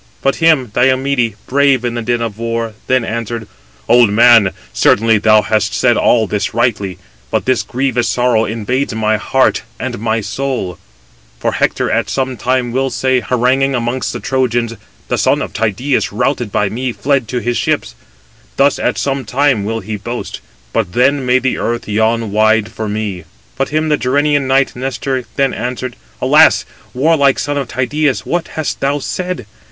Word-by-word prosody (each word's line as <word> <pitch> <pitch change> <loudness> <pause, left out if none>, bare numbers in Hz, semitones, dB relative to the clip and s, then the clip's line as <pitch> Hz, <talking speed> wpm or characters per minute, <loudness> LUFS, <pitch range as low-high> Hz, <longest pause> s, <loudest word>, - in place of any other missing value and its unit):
But 135 - +1
him 155 -8 +3
Diomede, 130 -2 +1
brave 135 -2 +2
in 120 - -1
the 120 - -3
din 120 +1 -1
of 110 -2 -5
war, 115 -1 -2
then 130 -2 +2
answered: 115 -1 -4 0.4
"Old 120 -1 +5
man, 115 -1 +6 0.2
certainly 110 0 +3
thou 110 0 +4
hast 110 0 0
said - - +3
all 115 -2 +3
this 105 +1 -2
rightly: 105 -6 0 0.3
but - - -1
this 130 -2 +2
grievous 125 -1 -1
sorrow 120 -3 +2
invades 115 +3 -2
my 110 -1 +1
heart 130 +5 +1 0.2
and 120 -3 -4
my 110 0 0
soul: 125 -5 -3 0.6
for - - 0
Hector - - 0
at - - 0
some 130 -1 -1
time 125 0 -1
will 135 +2 0
say, 130 0 +1
haranguing 130 +3 +1
amongst 120 +1 -2
the - - -5
Trojans, 120 -3 0 0.3
'The - - -1
son - - +2
of - - -5
Tydeus, 115 +5 0
routed 105 +1 -1
by 105 - +1
me, 125 +5 -3
fled 135 -1 0
to 125 - -3
his 120 0 -1
ships.' - - -1 0.6
Thus 140 +1 +3
at - - 0
some 135 -1 -1
time 130 -1 +1
will 115 +1 -2
he 105 +2 -5
boast: 120 +4 -6 0.3
but 85 - -1
then 130 +1 +2
may 125 +1 +4
the 130 0 -1
earth 120 0 -2
yawn 110 +1 0
wide 110 +1 +2
for 110 -1 -4
me." 105 -5 -4 0.3
But 135 +1 -1
him 155 +1 0
the 150 - +2
Gerenian 145 +2 +1
knight 135 +1 +2
Nestor 130 0 -3
then 135 -1 +1
answered: 125 0 -4 0.2
"Alas! - - +5 0.3
warlike 140 0 +3
son 145 +2 -2
of 135 - -3
Tydeus, 140 +3 -1
what 175 0 -1
hast 155 -2 -4
thou 140 +1 0
said? 180 - -4
125 Hz, 170 wpm, -15 LUFS, 110-135 Hz, 0.6 s, man